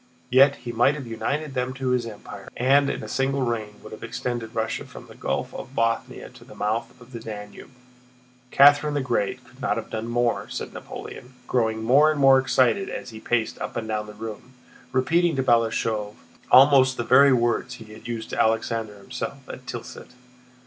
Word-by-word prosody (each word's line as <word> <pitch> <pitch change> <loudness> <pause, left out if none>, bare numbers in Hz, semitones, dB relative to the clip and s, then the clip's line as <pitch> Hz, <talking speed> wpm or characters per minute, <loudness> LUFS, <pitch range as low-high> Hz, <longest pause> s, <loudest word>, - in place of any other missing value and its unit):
Yet 135 +2 +6
he 120 - -7
might 120 +5 +3
have 140 -3 -7
united 140 +6 -3
them 130 0 -2
to 130 -1 -2
his 125 -2 0
empire 105 -2 -10
and 140 +3 +4
in - - -4
a - - -6
single 135 0 0
reign 110 -4 -3
would - - -11
have 110 - -10
extended 120 -2 -4
Russia 110 0 -2
from - - -12
the - - -14
Gulf - - -3
of 130 - -9
Bothnia 115 0 -1
to - - -15
the - - -14
mouths 110 +3 -3
of 125 0 -16
the 120 - -7
Danube. 105 -2 -9 0.8
Catherine 145 +2 +5
the 145 - +1
Great 125 0 -2
could 130 +2 -19
not - - 0
have 115 - -6
done 110 +1 -4
more," 120 0 0
said - - -6
Napoleon, 125 +1 -9
growing 110 -3 0
more 140 +7 +5
and 155 -2 -1
more 135 -1 +7
excited 130 +8 +2
as - - -6
he 110 - -9
paced 115 0 -1
up 105 - -5
and 110 - -4
down 105 -1 -2
the 105 - -10
room, 110 +3 -8 0.4
repeating 165 +6 +2
to 135 - 0
Balashëv 110 -3 +1 0.3
almost 130 0 +6
the 120 - -1
very 140 +3 +6
words 120 0 +1
he 110 -2 -12
had 110 +2 -12
used 115 -1 -5
to - - +1
Alexander 110 -1 0
himself 100 - -7
at - - -10
Tilsit. - - -8
120 Hz, 195 wpm, -24 LUFS, 110-135 Hz, 0.8 s, more